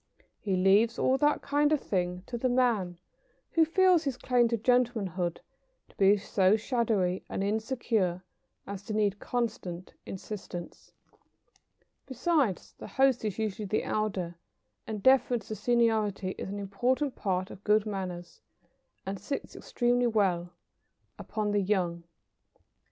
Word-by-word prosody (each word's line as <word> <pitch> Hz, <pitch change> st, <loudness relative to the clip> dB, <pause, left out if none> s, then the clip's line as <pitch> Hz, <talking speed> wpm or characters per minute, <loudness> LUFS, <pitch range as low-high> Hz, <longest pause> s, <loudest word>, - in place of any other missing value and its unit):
He 195 Hz, -3 st, -1 dB
leaves 200 Hz, +5 st, +4 dB
all 265 Hz, +1 st, +2 dB
that 295 Hz, 0 st, +2 dB
kind 290 Hz, +1 st, +2 dB
of 305 Hz, -, +3 dB
thing 180 Hz, -4 st, -2 dB
to 240 Hz, -, -6 dB
the 255 Hz, +2 st, 0 dB
man 230 Hz, -8 st, +1 dB, 0.5 s
who 330 Hz, -, +4 dB
feels 360 Hz, +1 st, +4 dB
his 275 Hz, -4 st, -2 dB
claim 245 Hz, -2 st, +2 dB
to 230 Hz, 0 st, 0 dB
gentlemanhood 215 Hz, -8 st, 0 dB, 0.5 s
to -, -, -23 dB
be 200 Hz, +1 st, +5 dB
so 195 Hz, 0 st, +3 dB
shadowy 215 Hz, -6 st, 0 dB
and 195 Hz, -, -2 dB
insecure 215 Hz, -4 st, -1 dB, 0.4 s
as 200 Hz, -1 st, -6 dB
to 215 Hz, -, -4 dB
need 205 Hz, -1 st, +1 dB
constant 220 Hz, -7 st, -3 dB
insistance. 190 Hz, -3 st, -7 dB, 1.2 s
Besides, 265 Hz, -, 0 dB
the -, -, -8 dB
host 265 Hz, -3 st, +2 dB
is 210 Hz, -4 st, -2 dB
usually 215 Hz, -1 st, -3 dB
the 215 Hz, -, 0 dB
elder, 190 Hz, -5 st, -2 dB, 0.5 s
and 215 Hz, -3 st, -5 dB
deference 250 Hz, -4 st, +3 dB
to 215 Hz, -, -3 dB
seniority 215 Hz, -3 st, +1 dB
is -, -, -6 dB
an 200 Hz, -, -4 dB
important 245 Hz, +8 st, -1 dB
part 185 Hz, -2 st, -2 dB
of 190 Hz, -, -12 dB
good 210 Hz, 0 st, +3 dB
manners, 180 Hz, -4 st, -5 dB, 0.6 s
and 195 Hz, 0 st, -4 dB
sits 275 Hz, +9 st, -5 dB
extremely 245 Hz, 0 st, +1 dB
well 190 Hz, -6 st, +1 dB, 0.7 s
upon 210 Hz, -1 st, -2 dB
the 205 Hz, 0 st, +2 dB
young. 180 Hz, -4 st, -1 dB
210 Hz, 135 wpm, -29 LUFS, 190-245 Hz, 1.2 s, be